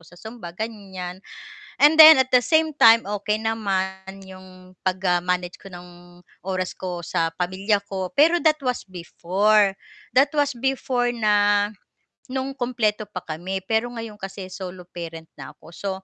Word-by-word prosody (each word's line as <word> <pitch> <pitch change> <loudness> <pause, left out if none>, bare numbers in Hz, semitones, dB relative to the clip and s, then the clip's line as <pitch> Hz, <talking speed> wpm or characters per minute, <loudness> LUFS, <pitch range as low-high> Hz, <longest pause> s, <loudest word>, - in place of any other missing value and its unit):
sa 175 - -17
zumba 220 -3 -10
ganiyan. 190 -5 -7 0.6
And 295 +2 +6
then 315 -2 +10
at 260 -1 +1
the 250 - +6
same 315 +2 +2
time, 230 -5 +6
okey 210 +1 -2
naman 195 -3 -3
'yong 185 -1 -14
pag, 185 0 -1
ah, 175 -1 +2
manage 180 0 -2
ko 195 - -11
ng 175 0 -14 0.2
oras 185 -1 -3
ko 180 -2 -5
sa 165 0 0
pamilya 190 +4 0
ko. 190 -2 -4
Pero 330 +4 +4
that 310 -1 +3
was 250 - -1
before, 195 +3 +1 0.3
that 275 +3 +3
was 290 -1 +2
before 250 -1 -1
na 205 -2 +2 0.6
no'ng 265 +1 -3
kumpleto 235 -5 -1
pa - - -5
kami, 175 +5 -4
pero 225 +2 0
ngayon 230 -2 -7
kasi 195 -1 -7
solo 185 -2 -8
parent 165 -2 -8
na - - -10
ako, - - -21
so 200 +2 -4
200 Hz, 155 wpm, -23 LUFS, 185-235 Hz, 0.6 s, then